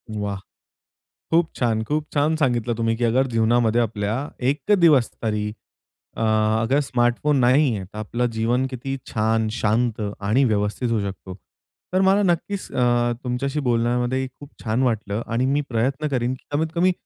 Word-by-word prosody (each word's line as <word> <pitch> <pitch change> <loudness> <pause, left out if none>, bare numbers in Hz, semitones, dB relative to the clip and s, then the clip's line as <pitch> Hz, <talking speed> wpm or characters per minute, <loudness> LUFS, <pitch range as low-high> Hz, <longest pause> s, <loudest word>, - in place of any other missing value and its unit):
वाह! 100 -2 -3 0.9
खूप 165 0 +3
छान 115 -3 0
खूप 150 +5 -2
छान 150 +2 +2
सांगितलं 120 -5 0
तुम्ही, 115 0 0
की 120 - -1
अगर 125 +4 +2
जीवनामध्ये 115 +1 +2
आपल्या 105 -2 -1 0.4
एक 145 +8 -1
दिवस 150 -9 +5
तरी 105 -1 -1 0.7
अ, - - -3 0.4
अगर 135 +6 +2
स्मार्टफोन 125 +2 +1
नाहीये. 125 -5 +3
तर 105 +3 -11
आपलं 120 +3 -1
जीवन 115 +3 +1
किती 135 +2 -4
छान, 110 0 0
शांत 115 0 0 0.2
आणि 110 +7 +2
व्यवस्थित 105 +2 0
होऊ 115 -2 +1
शकतो. 95 -1 -6 0.6
तर 185 - +3
मला 195 +2 +4
नक्कीच 185 +2 -1
अ, 120 -1 +2
तुमच्याशी 135 +4 -2
बोलण्यामध्ये 120 +2 +1
खूप 140 +3 -14
छान 115 +3 0
वाटलं 110 -3 -1
आणि 120 +3 0
मी 140 +2 +2
प्रयत्न 135 +6 0
करीन, 125 -1 -1
की - - -16
कमीत 160 +2 0
कमी 180 +2 +3
120 Hz, 155 wpm, -22 LUFS, 110-140 Hz, 0.9 s, दिवस